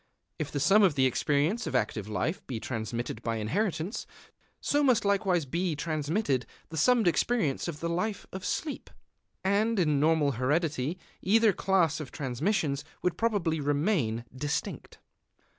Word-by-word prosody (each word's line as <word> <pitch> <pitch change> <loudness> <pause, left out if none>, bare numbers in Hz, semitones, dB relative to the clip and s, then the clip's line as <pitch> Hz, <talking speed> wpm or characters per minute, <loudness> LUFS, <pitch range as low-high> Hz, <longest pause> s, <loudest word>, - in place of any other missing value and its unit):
If - - -3
the 145 - -2
sum 195 +10 +5
of 185 -7 +4
the 135 -1 +3
experience 150 - +1
of - - -3
active 110 -4 0
life 130 - -2
be 120 -4 -3
transmitted 115 0 -4
by 115 -1 -2
inheritance, 165 - -2 0.5
so 290 - +1
must 255 -7 +3
likewise 190 -5 +2
be 170 +4 -1
transmitted 150 - -1 0.2
the 160 - -6
summed 230 +5 +4
experience 170 - +1
of 155 -3 -5
the 170 - -1
life 180 +5 -2
of 190 0 -6
sleep. 305 -3 -3 0.5
And 210 +4 +2
in 150 -6 +2
normal 155 -1 +3
heredity 145 +4 0 0.2
either 220 +2 +4
class 175 -6 +2
of 150 - -7
transmissions 140 - -1 0.2
would 180 - +1
probably 195 -9 0
remain 145 - 0
distinct. 145 +3 -3
160 Hz, 145 wpm, -29 LUFS, 140-195 Hz, 0.5 s, sum